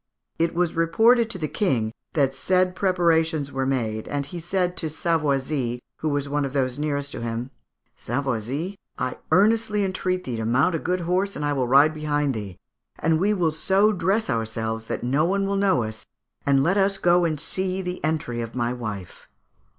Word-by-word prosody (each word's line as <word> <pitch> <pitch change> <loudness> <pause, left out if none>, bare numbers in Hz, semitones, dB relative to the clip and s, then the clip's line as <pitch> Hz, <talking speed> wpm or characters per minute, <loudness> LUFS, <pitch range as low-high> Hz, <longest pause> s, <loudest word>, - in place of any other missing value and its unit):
It 165 0 +1
was 175 -1 +1
reported 225 +8 +4
to 205 - -4
the 155 -4 -2
King 120 - 0 0.2
that 140 -4 +2
the - - -15
said 185 +4 +1
preparations 165 -6 +1
were 135 0 -1
made, 110 -5 -1
and 145 -1 -2
he 170 +5 -7
said 180 +1 -1
to 160 - -2
Savoisy, 145 -6 0 0.2
who 155 - -2
was 145 -1 -1
one 145 +1 0
of 135 -1 -3
those 130 -1 0
nearest 145 -1 -1
to - - -6
him, 115 +2 -4 0.5
'Savoisy, 140 - -3 0.2
I 125 - -2
earnestly 210 +1 +3
entreat 185 -1 -1
thee 120 -3 -4
to 110 - -3
mount 130 +9 +3
a 165 - 0
good 180 +3 -1
horse, 185 +4 0
and 150 - -3
I 145 - +1
will 130 -3 0
ride 140 +5 +5
behind 150 -2 0
thee, 100 -5 -6 0.4
and 160 0 +1
we 200 +4 +2
will 175 -6 +1
so 195 +7 +3
dress 200 +3 0
ourselves 110 0 -2
that - - -4
no 135 +5 +2
one 195 +3 +1
will 200 0 0
know 195 -9 +2
us, 110 0 -5 0.4
and 135 -1 +4
let 185 +6 +2
us 195 0 +2
go 175 -1 +3
and 155 -3 0
see 185 +4 -2
the 180 -3 -5
entry 145 -6 -1
of 115 +1 -6
my 120 0 0
wife.' 105 -7 -7
155 Hz, 195 wpm, -24 LUFS, 130-185 Hz, 0.5 s, ride